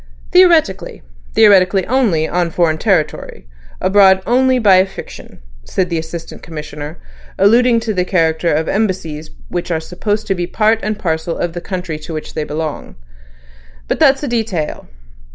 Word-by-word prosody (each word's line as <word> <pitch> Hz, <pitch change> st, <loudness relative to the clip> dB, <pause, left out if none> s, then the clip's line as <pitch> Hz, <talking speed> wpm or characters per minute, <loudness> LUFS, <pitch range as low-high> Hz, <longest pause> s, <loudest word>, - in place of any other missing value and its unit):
"Theoretically. 340 Hz, -, +3 dB, 0.3 s
Theoretically 195 Hz, -3 st, +5 dB
only, 220 Hz, -11 st, +1 dB
on 175 Hz, -1 st, -1 dB
foreign 160 Hz, -2 st, 0 dB
territory; 175 Hz, -, -1 dB, 0.3 s
abroad 190 Hz, -1 st, +4 dB
only 255 Hz, +1 st, +3 dB
by 205 Hz, -6 st, +5 dB
a 185 Hz, -, +4 dB
fiction," 190 Hz, -, -11 dB, 0.2 s
said 180 Hz, -, -2 dB
the 165 Hz, -, 0 dB
Assistant 160 Hz, +1 st, -8 dB
Commissioner, 150 Hz, 0 st, -8 dB, 0.4 s
alluding 230 Hz, +4 st, +4 dB
to 225 Hz, -1 st, -2 dB
the 180 Hz, -2 st, 0 dB
character 165 Hz, -2 st, +1 dB
of 155 Hz, +2 st, 0 dB
Embassies, 180 Hz, -7 st, -2 dB, 0.2 s
which 175 Hz, 0 st, -4 dB
are 165 Hz, -2 st, 0 dB
supposed 205 Hz, +6 st, -3 dB
to 195 Hz, -, 0 dB
be 175 Hz, -2 st, -3 dB
part 215 Hz, +4 st, +1 dB
and 215 Hz, 0 st, -3 dB
parcel 165 Hz, -3 st, -2 dB
of 170 Hz, -1 st, -3 dB
the 175 Hz, -, -6 dB
country 180 Hz, -5 st, -5 dB
to 155 Hz, +1 st, -7 dB
which 155 Hz, -, -7 dB
they 155 Hz, -, -2 dB
belong. 150 Hz, 0 st, -5 dB, 0.9 s
"But -, -, -2 dB
that's 270 Hz, +1 st, +4 dB
a -, -, -2 dB
detail. 220 Hz, -, -3 dB
185 Hz, 155 wpm, -16 LUFS, 160-215 Hz, 0.9 s, Theoretically